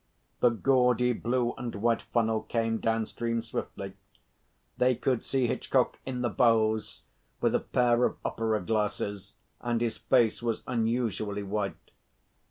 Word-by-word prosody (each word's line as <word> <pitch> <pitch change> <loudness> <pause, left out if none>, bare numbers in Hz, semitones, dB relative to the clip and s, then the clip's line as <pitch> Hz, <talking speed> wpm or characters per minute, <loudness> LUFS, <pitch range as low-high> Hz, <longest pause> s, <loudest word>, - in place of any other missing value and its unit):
The 125 - +5
gaudy 125 0 +3
blue 120 +1 0
and 120 -1 -4
white 115 +3 +1
funnel 110 -2 0
came 115 0 -1
downstream 115 +1 -1
swiftly. 100 -3 -5 0.9
They 125 0 +4
could 125 0 0
see 135 -2 +1
Hitchcock - - 0
in 125 -1 -3
the 120 - +1
bows, 110 -2 +2 0.4
with - - +2
a - - +3
pair 120 -1 +2
of - - -1
opera 110 -1 0
glasses, 105 0 -2 0.2
and 120 -1 -1
his 115 -1 -1
face 120 -4 +2
was 115 -2 -2
unusually 110 -4 -1
white. 100 0 -4
115 Hz, 135 wpm, -29 LUFS, 110-120 Hz, 0.9 s, The